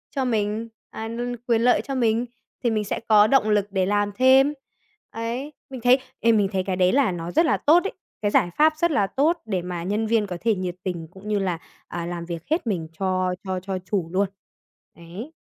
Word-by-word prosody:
cho 270 Hz, -, 0 dB
mình, 220 Hz, -1 st, -1 dB, 0.2 s
à, 220 Hz, -, -6 dB
n 240 Hz, +2 st, -3 dB
quyền 230 Hz, -2 st, +3 dB
lợi 245 Hz, +1 st, +4 dB
cho 275 Hz, -, -5 dB
mình, 235 Hz, -1 st, +2 dB, 0.4 s
thì 235 Hz, -, +2 dB
mình 215 Hz, -1 st, 0 dB
sẽ 205 Hz, -, -3 dB
có 210 Hz, 0 st, +7 dB
động 235 Hz, -4 st, +3 dB
lực 205 Hz, -1 st, +2 dB
để 190 Hz, -2 st, +1 dB
làm 205 Hz, +1 st, +1 dB
thêm. 265 Hz, +3 st, +5 dB, 0.6 s
Ấy, 240 Hz, +6 st, -4 dB, 0.2 s
mình 260 Hz, -3 st, -7 dB
thấy, 255 Hz, +2 st, +5 dB, 0.2 s
ê, 230 Hz, -, +4 dB
mình 210 Hz, -3 st, +3 dB
thấy 190 Hz, -2 st, 0 dB
cái 185 Hz, 0 st, -2 dB
đấy 180 Hz, 0 st, +3 dB
là 265 Hz, -7 st, +3 dB
nó 170 Hz, 0 st, -5 dB
rất 330 Hz, -, +3 dB
là 310 Hz, -, +2 dB
tốt 335 Hz, +5 st, +4 dB
ấy, 400 Hz, -, -3 dB, 0.3 s
cái 205 Hz, -1 st, +1 dB
giải 175 Hz, -, +3 dB
pháp 310 Hz, +1 st, +5 dB
rất 340 Hz, +1 st, +2 dB
là 205 Hz, -9 st, +2 dB
tốt 320 Hz, -, +1 dB
để 190 Hz, -5 st, -1 dB
mà 175 Hz, -1 st, -5 dB
nhân 210 Hz, +4 st, -1 dB
viên 220 Hz, -2 st, +2 dB
có 180 Hz, -2 st, -5 dB
thể 225 Hz, -2 st, +2 dB
nhiệt 180 Hz, -1 st, -3 dB
tình 170 Hz, -3 st, -4 dB
cũng 195 Hz, +3 st, -12 dB
như 210 Hz, -1 st, +1 dB
là, 185 Hz, -3 st, -1 dB, 0.3 s
à, 170 Hz, 0 st, -5 dB
làm 175 Hz, -1 st, -5 dB
việc 170 Hz, -1 st, -6 dB
hết 320 Hz, -5 st, 0 dB
mình 170 Hz, -7 st, -1 dB
cho 185 Hz, -1 st, 0 dB
cho 185 Hz, -1 st, -2 dB
cho 190 Hz, 0 st, -4 dB
chủ 185 Hz, -5 st, -1 dB
luôn. 195 Hz, +1 st, +2 dB, 0.7 s
Đấy. 185 Hz, -, -9 dB
210 Hz, 230 wpm, -24 LUFS, 185-245 Hz, 0.7 s, có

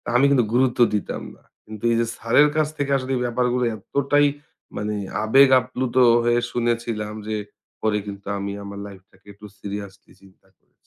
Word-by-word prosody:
আমি 135 Hz, +3 st, +5 dB
কিন্তু 125 Hz, -5 st, +3 dB
গুরুত্ব 125 Hz, 0 st, +2 dB, 0.2 s
দিতাম 105 Hz, -, -4 dB
না। -, -, -27 dB, 0.2 s
কিন্তু 110 Hz, 0 st, -10 dB
এই 115 Hz, -, +2 dB
যে -, -, +1 dB
স্যারের 130 Hz, +6 st, +4 dB
কাছ 155 Hz, -1 st, +2 dB
থেকে 140 Hz, -1 st, -2 dB
আসলে 130 Hz, 0 st, -5 dB
এ -, -, -2 dB
ব্যাপারগুলো 125 Hz, +1 st, 0 dB
এতটাই 145 Hz, +3 st, +1 dB, 0.5 s
মানে 105 Hz, 0 st, -2 dB, 0.3 s
আবেগ 135 Hz, +5 st, +6 dB
আপ্লুত 125 Hz, 0 st, -4 dB, 0.3 s
হয়ে 120 Hz, 0 st, +3 dB
শুনেছিলাম 115 Hz, -3 st, -2 dB
যে 110 Hz, 0 st, -2 dB, 0.4 s
পরে 110 Hz, -1 st, +1 dB
কিন্তু 100 Hz, -1 st, -9 dB
আমি 100 Hz, 0 st, -4 dB
আমার 100 Hz, 0 st, -8 dB
লাইফটাকে 95 Hz, 0 st, -17 dB
একটু 105 Hz, +1 st, -15 dB
সিরিয়াসলি 100 Hz, -1 st, -8 dB
চিন্তা 95 Hz, -1 st, -22 dB
করেছি। -, -, -44 dB
115 Hz, 165 wpm, -22 LUFS, 105-130 Hz, 0.5 s, আবেগ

